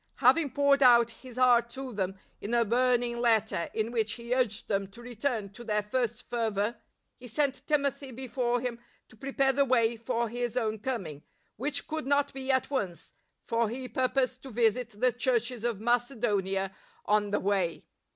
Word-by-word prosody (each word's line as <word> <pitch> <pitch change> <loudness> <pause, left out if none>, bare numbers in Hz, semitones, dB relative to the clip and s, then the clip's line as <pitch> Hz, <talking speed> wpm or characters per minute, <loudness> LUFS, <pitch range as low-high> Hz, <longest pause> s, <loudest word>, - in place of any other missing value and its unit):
Having 325 -4 +4
poured 280 0 +3
out 235 -2 +6
his 250 +1 -13
heart 240 -2 +4
to 260 +1 -7
them 190 -2 -2 0.2
in 225 +4 -2
a 235 -1 +3
burning 240 +1 +2
letter 220 -7 +1
in 220 +1 -2
which 220 -3 0
he 235 0 -3
urged 235 -4 0
them 195 -2 0
to 200 - -15
return 240 -3 -3
to 240 - -11
their 210 -2 0
first 240 +2 -2
fervour, 225 -1 -1 0.4
he 250 - -10
sent 275 +2 -1
Timothy 280 -2 0
before 245 -1 -1
him 240 -2 -3 0.3
to - - -17
prepare 270 +2 +1
the 280 +2 +3
way 235 -3 +3
for 230 +1 -1
his 240 +1 -3
own 220 -3 0
coming, 195 - -4 0.3
which 285 +5 -1
could 315 -3 -4
not 285 0 +2
be 265 0 -6
at 260 +1 +1
once, 195 -11 -3 0.3
for 230 -1 0
he 255 +3 -5
purposed 255 +1 0
to 270 - -9
visit 230 -1 0
the 255 +1 +4
Churches 245 -2 0
of 235 -4 -1
Macedonia 215 -5 0 0.3
on 210 0 +2
the 205 - +1
way. 190 -4 0
240 Hz, 175 wpm, -29 LUFS, 220-255 Hz, 0.4 s, out